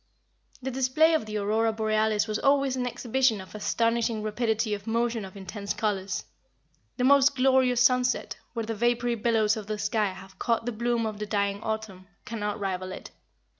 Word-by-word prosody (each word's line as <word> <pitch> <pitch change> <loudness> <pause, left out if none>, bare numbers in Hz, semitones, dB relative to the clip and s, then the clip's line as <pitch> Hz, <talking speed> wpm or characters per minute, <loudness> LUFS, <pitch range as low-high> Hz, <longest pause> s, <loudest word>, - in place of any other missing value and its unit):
The 265 - -2
display 265 +6 +3
of 270 -9 0
the 215 0 -3
Aurora 220 +2 +1
Borealis 215 -1 +1
was 215 0 -2
always 275 -1 +3
an 250 -1 -1
exhibition 245 -2 +1
of 190 - -11
astonishing 230 +1 0
rapidity 220 0 0
of 205 0 -6
motion 230 0 0
of 190 +1 -10
intense 200 +1 -5
colors. 200 -3 -2 0.7
The 250 - 0
most 280 +1 +5
glorious 260 -2 +3
sunset 250 0 +2 0.2
where 230 -2 -3
the 225 - -3
vapory 240 +2 +1
billows 225 -1 +2
of 210 -2 -7
the 215 0 -2
sky 215 0 +1
have 190 +1 -13
caught 230 -1 0
the 245 - -1
bloom 235 +1 0
of 215 -1 -4
the 210 - -4
dying 200 -1 0
Autumn 220 -4 -5 0.2
cannot 210 -2 -3
rival 185 -2 -3
it. - - -9
220 Hz, 175 wpm, -27 LUFS, 210-245 Hz, 0.7 s, most